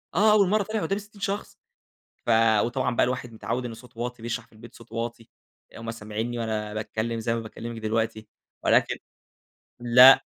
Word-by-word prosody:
آه. 210 Hz, +3 st, +5 dB
أول 200 Hz, -3 st, +5 dB
مرّة 210 Hz, 0 st, +3 dB
فعلًأ 220 Hz, +2 st, -3 dB
يبقى 165 Hz, -, -1 dB
قُدّامي 195 Hz, +1 st, 0 dB
60 205 Hz, -1 st, -17 dB
شخص. 200 Hz, +1 st, -3 dB, 0.7 s
ف -, -, -3 dB, 0.4 s
وطبعًا 125 Hz, 0 st, -1 dB
بقى -, -, +4 dB
الواحد 125 Hz, -2 st, -3 dB
مِتعوّد 120 Hz, +3 st, -3 dB
إن 115 Hz, -, -5 dB
صوته 115 Hz, +1 st, -14 dB
واطي 120 Hz, -1 st, -4 dB
بيشرح 115 Hz, 0 st, -3 dB
في -, -, -27 dB
البيت 115 Hz, +2 st, -13 dB
بصوت 115 Hz, -, -16 dB
واطي. 115 Hz, 0 st, -5 dB, 0.5 s
هم 115 Hz, 0 st, -5 dB
سامعينّي 115 Hz, +2 st, -4 dB
وأنا 105 Hz, -2 st, -2 dB
باتكلّم 110 Hz, +1 st, -2 dB
زي 115 Hz, +1 st, 0 dB
ما -, -, -1 dB
باكلّمِك 115 Hz, +1 st, -7 dB
دلوقتي 110 Hz, 0 st, -1 dB, 0.4 s
ولكن -, -, +4 dB, 0.9 s
لأ. 125 Hz, +2 st, +8 dB
115 Hz, 180 wpm, -26 LUFS, 115-130 Hz, 0.9 s, لأ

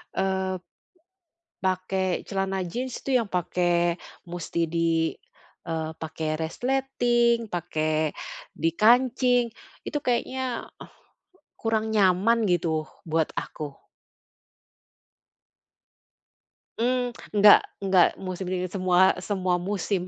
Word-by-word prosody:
eee, 190 Hz, -1 st, 0 dB, 1.0 s
pakai 185 Hz, 0 st, 0 dB
celana 195 Hz, -1 st, -1 dB
jeans 245 Hz, +7 st, -4 dB
itu 260 Hz, -2 st, +2 dB
yang 230 Hz, -, -1 dB
pakai 175 Hz, -1 st, +1 dB, 0.3 s
musti 170 Hz, -1 st, -2 dB
di 165 Hz, -1 st, +1 dB, 0.6 s
eee, 160 Hz, -1 st, -2 dB
pakai 160 Hz, 0 st, -4 dB
resleting, 240 Hz, +3 st, +1 dB
pakai 155 Hz, -3 st, -1 dB, 0.4 s
dikancing, 245 Hz, -, +3 dB, 0.4 s
itu 295 Hz, -, -1 dB
kayaknya 255 Hz, 0 st, -2 dB, 0.9 s
kurang 220 Hz, -1 st, 0 dB
nyaman 210 Hz, +3 st, +3 dB
gitu 160 Hz, -3 st, 0 dB, 0.2 s
buat 160 Hz, 0 st, +1 dB
aku. 145 Hz, -3 st, -6 dB, 3.0 s
Mmm, 245 Hz, +1 st, +1 dB, 0.2 s
enggak 205 Hz, 0 st, +8 dB, 0.2 s
enggak 190 Hz, -2 st, +5 dB
musim 185 Hz, 0 st, -5 dB
dingin 185 Hz, 0 st, -2 dB
semua 185 Hz, -1 st, +4 dB
semua 185 Hz, -2 st, 0 dB
musim. 190 Hz, +1 st, -1 dB
190 Hz, 85 wpm, -26 LUFS, 170-230 Hz, 3.0 s, enggak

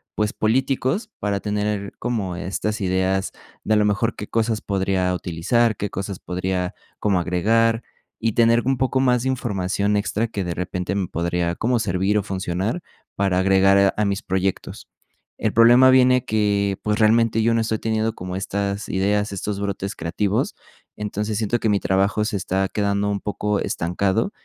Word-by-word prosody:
pues 105 Hz, 0 st, 0 dB
políticos, 130 Hz, -, 0 dB
para 100 Hz, -1 st, -1 dB
tener 105 Hz, -1 st, -2 dB
como 105 Hz, -7 st, -2 dB
estas 100 Hz, +4 st, -3 dB
ideas 95 Hz, 0 st, 0 dB, 0.3 s
de, 110 Hz, -, +2 dB
a -, -, +4 dB
lo 105 Hz, -, +3 dB
mejor, 105 Hz, +3 st, 0 dB
qué 105 Hz, -, -7 dB
cosas 110 Hz, -1 st, 0 dB
podría 95 Hz, -2 st, 0 dB
utilizar, 90 Hz, +7 st, +1 dB
qué 105 Hz, -, -3 dB
cosas 95 Hz, 0 st, -5 dB
podría 90 Hz, 0 st, -3 dB, 0.2 s
como 100 Hz, -3 st, +2 dB
agregar 115 Hz, +6 st, +2 dB, 0.4 s
y 115 Hz, -1 st, 0 dB
tener 115 Hz, +1 st, +4 dB
un 135 Hz, 0 st, +1 dB
poco 130 Hz, +1 st, +1 dB
más 125 Hz, -2 st, +2 dB
de 130 Hz, -, 0 dB
información 100 Hz, -4 st, 0 dB
extra 105 Hz, +2 st, -1 dB
que 105 Hz, -3 st, -4 dB
de 85 Hz, -, -2 dB
repente 90 Hz, +1 st, -3 dB
me 95 Hz, -3 st, -1 dB
podría 85 Hz, +1 st, -1 dB
como 120 Hz, +4 st, 0 dB
servir 95 Hz, 0 st, 0 dB
o 105 Hz, -, +1 dB
funcionar 95 Hz, -, -2 dB, 0.3 s
para 95 Hz, -2 st, +1 dB
agregar 95 Hz, +1 st, +4 dB
a 105 Hz, -, +2 dB
mis 100 Hz, -1 st, -1 dB
proyectos. 95 Hz, 0 st, -2 dB, 0.5 s
El 110 Hz, -, 0 dB
problema 120 Hz, +3 st, +7 dB
viene 125 Hz, -1 st, +5 dB
que, 100 Hz, -2 st, +1 dB
pues 105 Hz, +1 st, 0 dB
realmente 115 Hz, +1 st, +3 dB
yo 115 Hz, +1 st, +3 dB
no 115 Hz, -, +2 dB
estoy 110 Hz, -1 st, -1 dB
teniendo 110 Hz, 0 st, 0 dB
como 90 Hz, 0 st, -6 dB
estas 100 Hz, +1 st, -3 dB
ideas, 105 Hz, +2 st, 0 dB
estos 100 Hz, +1 st, -3 dB
brotes 100 Hz, -1 st, -3 dB
creativos. 100 Hz, +5 st, -1 dB, 0.4 s
Entonces 105 Hz, 0 st, -3 dB
siento 115 Hz, +2 st, 0 dB
que 110 Hz, -, 0 dB
mi 100 Hz, -1 st, +2 dB
trabajo 100 Hz, +3 st, +1 dB
se 105 Hz, -, -1 dB
está 95 Hz, +1 st, -1 dB
quedando 100 Hz, 0 st, 0 dB
un 100 Hz, -1 st, -1 dB
poco 105 Hz, 0 st, -1 dB
estancado 95 Hz, -, -1 dB
100 Hz, 170 wpm, -22 LUFS, 95-110 Hz, 0.5 s, problema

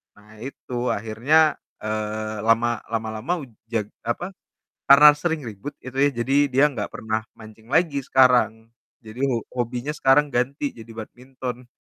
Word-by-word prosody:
Nah, 105 Hz, +1 st, -18 dB
itu 135 Hz, -1 st, -9 dB, 0.2 s
akhirnya, 130 Hz, +9 st, +2 dB, 0.3 s
eee, 110 Hz, 0 st, -3 dB
lama 120 Hz, +1 st, +3 dB, 0.2 s
lama-lama 110 Hz, +6 st, -2 dB
u -, -, -8 dB, 0.3 s
jag 110 Hz, -3 st, -1 dB, 0.2 s
apa, 120 Hz, +11 st, -2 dB, 0.6 s
karena 140 Hz, +2 st, +10 dB
sering 160 Hz, 0 st, -2 dB
ribut 110 Hz, +8 st, -8 dB
itu 130 Hz, +1 st, -8 dB
ya, 145 Hz, -, +3 dB
jadi 135 Hz, +3 st, +1 dB, 0.2 s
dia 135 Hz, +3 st, +5 dB
nggak 105 Hz, -6 st, -4 dB
pernah 110 Hz, 0 st, -2 dB, 0.2 s
mancing 110 Hz, +1 st, -14 dB
lagi 160 Hz, -4 st, +2 dB
sekarang, 120 Hz, -4 st, +3 dB, 0.4 s
jadi 110 Hz, +3 st, -10 dB
ho 115 Hz, -3 st, -1 dB, 0.2 s
hobinya 125 Hz, +4 st, -4 dB
sekarang 145 Hz, +2 st, +4 dB
ganti 135 Hz, +4 st, -1 dB
jadi 115 Hz, 0 st, -13 dB
badminton. 125 Hz, +2 st, -8 dB
120 Hz, 140 wpm, -23 LUFS, 110-140 Hz, 0.6 s, karena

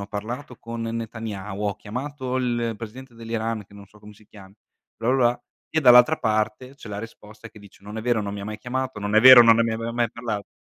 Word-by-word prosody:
ho 100 Hz, -, -6 dB
parlato 120 Hz, +6 st, -6 dB
con 115 Hz, 0 st, -7 dB
Netanyahu, 110 Hz, -3 st, -5 dB
ho 100 Hz, -1 st, -2 dB
chiamato 130 Hz, +3 st, -5 dB
il 120 Hz, -3 st, -1 dB
presidente 120 Hz, +3 st, -10 dB
dell'Iran", 115 Hz, -1 st, -4 dB
che 100 Hz, -, -19 dB
non 100 Hz, -1 st, -13 dB
so 105 Hz, -, -21 dB
come 105 Hz, 0 st, -13 dB
si 105 Hz, 0 st, -22 dB
chiami, 100 Hz, -2 st, -16 dB, 0.4 s
bla 115 Hz, -, -3 dB
bla 130 Hz, -, +2 dB
bla. 120 Hz, -2 st, +1 dB, 0.3 s
E 160 Hz, -, +2 dB
dall'altra 125 Hz, +3 st, +7 dB
parte 110 Hz, +3 st, -2 dB
c'è 125 Hz, -, -12 dB
la 100 Hz, -1 st, -5 dB
risposta 110 Hz, 0 st, -11 dB
che 110 Hz, -, -16 dB
dice: 100 Hz, -1 st, -18 dB
"Non 105 Hz, +2 st, -8 dB
è 110 Hz, -, -4 dB
vero, 120 Hz, -1 st, +1 dB
non 100 Hz, -1 st, -5 dB
mi 100 Hz, -, -6 dB
ha -, -, -6 dB
mai 105 Hz, +1 st, -6 dB
chiamato, 130 Hz, 0 st, -4 dB
non 105 Hz, +1 st, -3 dB
è 110 Hz, -, +6 dB
vero, 130 Hz, 0 st, +10 dB
non 115 Hz, -1 st, +6 dB
me 115 Hz, -, +3 dB
ne 115 Hz, -, -1 dB
aveva 115 Hz, +1 st, -4 dB
mai 120 Hz, -1 st, 0 dB
parlato." 110 Hz, -4 st, -5 dB
115 Hz, 245 wpm, -23 LUFS, 105-120 Hz, 0.4 s, vero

